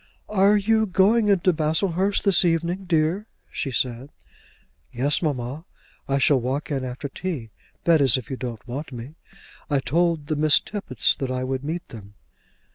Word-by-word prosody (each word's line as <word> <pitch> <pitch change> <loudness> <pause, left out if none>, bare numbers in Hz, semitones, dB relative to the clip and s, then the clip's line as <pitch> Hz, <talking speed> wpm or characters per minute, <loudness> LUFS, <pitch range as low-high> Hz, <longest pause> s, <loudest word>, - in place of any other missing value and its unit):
"Are 205 0 +4
you 220 +2 +2
going 210 +4 +3
into 190 -2 +3
Baslehurst 170 +5 0
this 195 -3 +4
evening, 170 +2 0
dear?" 170 +4 0 0.2
she 140 - -3
said. 125 +1 -2 0.8
"Yes, 140 +5 0
mamma; 140 -1 -3 0.4
I 135 - +1
shall 140 0 +4
walk 130 +5 -3
in 135 -2 -1
after 130 +3 -5
tea; 140 - -5 0.3
that 165 -3 +4
is 130 -3 +5
if 130 - -7
you - - -2
don't 120 -3 -7
want 140 +5 -6
me. 125 +3 -8 0.6
I 145 -2 +2
told 165 +2 0
the 155 +1 -2
Miss 150 0 +5
Tappitts 195 - -1
I 130 -1 -2
would 130 +1 -3
meet 165 +4 -4
them." 105 -3 -12
150 Hz, 160 wpm, -24 LUFS, 130-180 Hz, 0.8 s, is